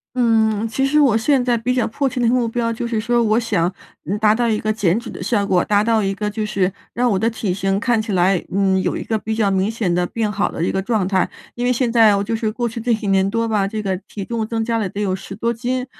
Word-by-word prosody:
嗯， 225 -3 +2
其 250 +4 -1
实 295 +3 +2
我 270 -7 +4
现 255 +4 +2
在 245 -1 +2
比 240 +3 -1
较 250 -2 +1
迫 275 +5 -1
切 255 - -5
的 240 - +2
目 240 0 +2
标 230 0 -1
就 230 +1 -4
是 230 -1 -1
说， 240 +2 +1
我 220 0 +2
想， 180 -7 0 0.3
嗯， 205 - -2
达 215 0 +4
到 240 0 +1
一 215 -2 +1
个 215 0 -1
减 205 -3 +1
脂 235 - -8
的 - - -8
效 205 -4 0
果， 180 -3 +2
达 205 0 +2
到 225 -1 +2
一 195 0 0
个 210 +2 -3
就 215 +1 -3
是 195 -3 0 0.2
让 245 +1 +1
我 205 - +1
的 225 +5 +1
体 210 -5 -2
型 195 +1 0
看 230 0 +1
起 215 - -6
来， 185 -1 +2
嗯， 190 -1 +2
有 - - -1
一 - - -4
个 225 - -1
比 220 +1 -3
较 205 -3 +2
明 190 +2 +1
显 220 -6 -1
得 180 0 +1
变 225 -2 -2
好 205 0 -1
的 165 - -3
一 - - 0
个 190 - -1
状 215 -3 0
态。 190 -2 +1 0.2
因 240 - -3
为 250 - +3
现 245 -1 0
在， 220 -3 +5
我 200 - -1
就 225 +2 -2
是 220 -1 -1
过 240 +2 -2
去 230 +1 -6
这 240 +1 0
几 220 -2 -1
年 195 0 +2
多 230 +2 0
吧， 210 -3 0
这 215 +1 -4
个 195 -3 -1
体 200 - -6
重 230 +1 -2
增 225 0 -2
加 230 0 0
了 210 -4 -1
得 200 - -6
有 195 -3 0
10 190 +1 -8
多 230 +3 0
斤， 250 +2 -2
220 Hz, 310 characters per minute, -20 LUFS, 200-235 Hz, 0.3 s, 在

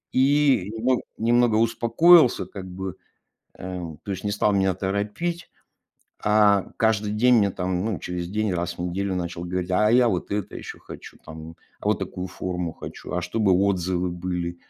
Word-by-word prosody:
И 135 -6 +3
немо 125 +3 +1 0.2
немного 120 -1 +3
успокоился 120 +7 +4
как 95 -2 -9
бы, 95 0 -6 0.7
э, 90 -4 -6
то 100 - -4
есть 95 - -6
не 100 - -1
стал 105 0 +1
меня 95 -1 +2
торопить. 105 - -3 0.7
А 105 -2 +4
каждый 110 -2 +1
день 120 +4 +4
мне 100 -2 +3
там, 90 +1 -2
ну, 110 -6 -2
через 90 -1 -4
день, 105 0 -1
раз 85 0 -3
в - - -5
неделю 95 +2 -2
начал 85 -1 -4
говорить: 90 +1 -3
"А 105 +4 +3
я 125 0 +5
вот 95 -4 -2
это 100 -1 -3
ещё - - -8
хочу, - - -11
там, 80 +1 -10 0.2
а - - -13
вот - - +2
такую 90 0 -5
форму 90 -3 -4
хочу. - - -9
А 90 - -1
чтобы 95 +2 +1
отзывы 90 -1 +1
были. 90 0 -4
95 Hz, 170 wpm, -24 LUFS, 90-110 Hz, 0.7 s, я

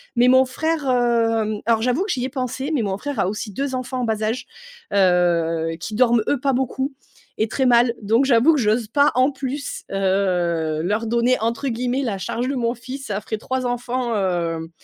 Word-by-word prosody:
mais 245 +1 +4
mon 260 +1 +6
frère, 315 +4 -2
hem, 230 -3 +1
alors, 225 -1 +2
j'avoue 255 +9 +1
que 405 - -3
j'y 250 -2 -1
ai 265 - -3
pensé 260 +2 -3
mais 265 - +1
mon 195 -2 -2
frère 285 -1 -5
a - - +2
aussi 210 +2 -4
2 270 +6 -3
enfants 255 0 -3
en - - -1
bas 220 -1 -1
âge, 225 +4 -2 0.5
heu, 170 -3 +2
qui 210 +4 -5
dorment, 240 -1 +4
eux, 285 - +1
pas 275 +1 +1
beaucoup 265 +2 -1 0.5
et 220 - +2
très 265 +4 -1
mal. 240 -1 +4
Donc, 225 +6 +3
j'avoue 265 +4 +5
que 295 - +1
j'ose 220 0 +1
pas, 285 +5 +3
en 255 +3 +3
plus, 275 +1 -5
heu, 180 -5 0
leur 210 +5 -1
donner 235 +2 +2
entre 230 +4 -1
guillemets 250 +3 -1
«la 215 -6 -2
charge 235 +4 -3
de 275 - -1
mon 235 -1 -1
fils». 265 +3 -8
Ça 205 0 -3
ferait 220 +1 -4
3 260 +2 -3
enfants, 245 0 -2
hem, 170 -4 -1
235 Hz, 205 wpm, -21 LUFS, 210-260 Hz, 0.5 s, mon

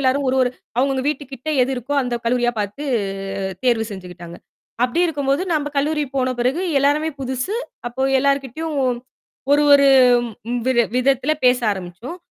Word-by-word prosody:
எல்லாரும் 275 +1 +1
ஒரு 260 - +1
ஒரு 255 - +3 0.3
அவுங்க 250 - +3
அவுங்க 260 - -1
வீட்டு 295 -1 -1
கிட்ட 270 +3 -7
எது 255 - 0
இருக்கோ 255 +3 -5
அந்தக் 240 -2 -3
கல்லூரியா 240 +1 +2
பாத்து, 210 +7 -4 0.7
அ - - -5
தேர்வு 235 -3 +2
செஞ்சுக்கிட்டாங்க. 180 -3 -9 0.5
அப்படி 250 +7 +1
இருக்கும்போது, 285 -1 0
நம்ப 295 -2 0
கல்லூரி 300 +2 +1
போன 255 -1 +1
பிறகு 255 +7 +1 0.2
எல்லாமே 290 +3 +2
புதுசு. 260 - -3 0.3
அப்போ 240 +2 -3 0.2
எல்லார்கிட்டயும் 280 +3 -1 0.8
ஒரு 290 +1 +5
ஒரு 280 -1 +7 0.6
ம் 245 0 -1
வி 260 - +3 0.2
விதத்துல 265 +3 +2
பேச 250 0 +5
ஆரம்பிச்சோம். 190 - -7
260 Hz, 155 wpm, -20 LUFS, 240-285 Hz, 0.8 s, ஒரு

